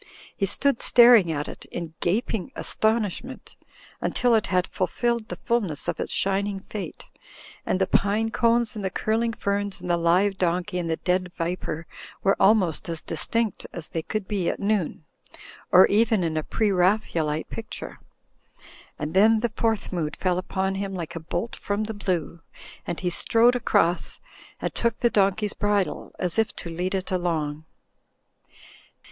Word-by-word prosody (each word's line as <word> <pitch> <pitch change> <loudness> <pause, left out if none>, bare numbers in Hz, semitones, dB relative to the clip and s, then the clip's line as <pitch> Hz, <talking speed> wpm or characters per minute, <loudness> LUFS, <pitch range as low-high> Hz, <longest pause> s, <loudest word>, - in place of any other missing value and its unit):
He 195 - 0
stood 275 +5 +1
staring 235 -8 +7
at 145 -1 -2
it - - -8
in 170 -2 -6
gaping 220 +4 -1
astonish 220 -3 0
ment, - - -10 0.5
until 245 -1 +1
it 220 -2 +2
had 180 0 +2
fulfilled 235 +4 -1
the - - -5
fulness 205 -11 -1
of - - -2
its - - -3
shining 195 0 0
fate; 200 +1 -7 0.6
and 185 - +1
the 190 - +3
pine 210 +4 +1
cones 235 0 +2
and 210 - -5
the 190 - 0
curiing 225 +4 0
ferns 200 -3 -2
and 180 - -8
the 170 - +3
live 185 +4 +2
donkey 180 +1 0
and 170 -2 -3
the 160 - +1
dead 180 0 0
viper 170 -1 -3 0.4
were 195 - +4
almost 195 -6 +3
as 165 -1 -3
distinct 220 +7 -1
as 170 -3 -6
they 165 - -2
could 210 +4 -4
be 195 -5 0
at - - -3
noon, 200 -6 -1 0.7
or 185 +1 +9
in 205 -6 +2
a 155 - +1
Preraphaelite 180 -5 +1
pic 225 -1 -6
ture. - - -8 1.0
And 150 +1 -4
then 215 +3 +5
the 240 - +1
Fourth 225 -3 -1
Mood 160 -4 -2
fell 180 -1 0
upon 190 +1 -2
him 195 0 -3
like 170 -2 -5
a - - -3
bolt 175 +7 -4
from 205 +1 -2
the 220 +1 -4
blue, 175 -5 -2 0.5
and 170 - -3
he 180 -1 -1
strode 230 +7 +4
across 175 -7 +1 0.4
and - - -3
took 235 -1 0
the 240 - +3
donkey's 200 +1 +2
bridle, 205 -2 -1
as 180 +3 -1
if 220 - 0
to 170 - -6
lead 180 +3 -2
it 190 0 -3
along. 160 -4 -1
195 Hz, 165 wpm, -25 LUFS, 175-220 Hz, 1.0 s, or